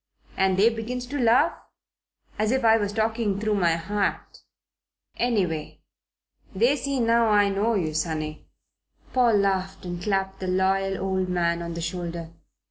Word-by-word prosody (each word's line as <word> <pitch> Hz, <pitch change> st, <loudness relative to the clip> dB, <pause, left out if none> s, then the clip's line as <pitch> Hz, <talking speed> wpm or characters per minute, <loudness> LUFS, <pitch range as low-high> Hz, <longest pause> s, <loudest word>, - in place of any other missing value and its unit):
And 190 Hz, -1 st, +2 dB
they 210 Hz, +4 st, +5 dB
begins 240 Hz, +2 st, -5 dB
to 285 Hz, +3 st, -4 dB
laugh, 245 Hz, +7 st, +4 dB, 0.9 s
as 215 Hz, 0 st, +1 dB
if 260 Hz, +1 st, +1 dB
I 225 Hz, 0 st, +6 dB
was 205 Hz, -2 st, -1 dB
talking 220 Hz, -2 st, -1 dB
through 215 Hz, 0 st, 0 dB
my 175 Hz, -5 st, +2 dB
hat. 200 Hz, +5 st, -3 dB, 0.8 s
Anyway, 185 Hz, -10 st, -1 dB, 0.7 s
they 235 Hz, +8 st, +3 dB
see 280 Hz, -1 st, -2 dB
now 230 Hz, 0 st, +3 dB
I 205 Hz, -1 st, +4 dB
know 210 Hz, +4 st, +1 dB
you, 160 Hz, -6 st, -1 dB
sonny." 155 Hz, -1 st, -3 dB, 0.7 s
Paul 245 Hz, -3 st, +4 dB
laughed 190 Hz, -1 st, -1 dB
and 175 Hz, -1 st, -5 dB
clapped 195 Hz, 0 st, -1 dB
the 185 Hz, -, -4 dB
loyal 190 Hz, +1 st, +1 dB
old 190 Hz, -1 st, -1 dB
man 170 Hz, -1 st, 0 dB
on 170 Hz, 0 st, -5 dB
the 170 Hz, -, -4 dB
shoulder. 170 Hz, -1 st, -5 dB
195 Hz, 150 wpm, -25 LUFS, 180-225 Hz, 0.9 s, I